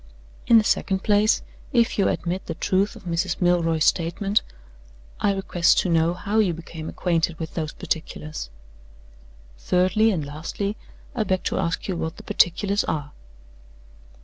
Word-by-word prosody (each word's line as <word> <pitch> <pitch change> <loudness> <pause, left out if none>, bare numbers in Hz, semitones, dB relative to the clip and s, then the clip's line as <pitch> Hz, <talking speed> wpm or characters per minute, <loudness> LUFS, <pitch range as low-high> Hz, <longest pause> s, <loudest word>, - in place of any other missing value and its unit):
In 230 - +7
the 220 - +5
second 190 -2 0
place, 210 +1 +3 0.3
if 235 -3 +2
you 195 - +4
admit 180 +2 -2
the - - -4
truth 195 +2 0
of - - -13
Mrs. 175 +1 -1
Milroy's 165 -3 +2
statement, 190 +5 +1 0.8
I 205 - +2
request 190 -3 +2
to 185 - -2
know 165 +1 +2
how 205 +4 -1
you 185 -6 +2
became 160 -1 -8
acquainted 170 -2 0
with 160 -1 -6
those 155 -3 -3
particulars? 155 - -4 1.1
Thirdly, 185 - +3
and 170 -9 -1
lastly, 165 +8 -4 0.4
I 240 - -1
beg 185 -3 -1
to - - -1
ask 170 0 -2
you 190 - -1
what 160 -1 -4
the - - -10
particulars 200 +4 +2
are? 145 -2 -3
180 Hz, 150 wpm, -24 LUFS, 165-200 Hz, 1.1 s, In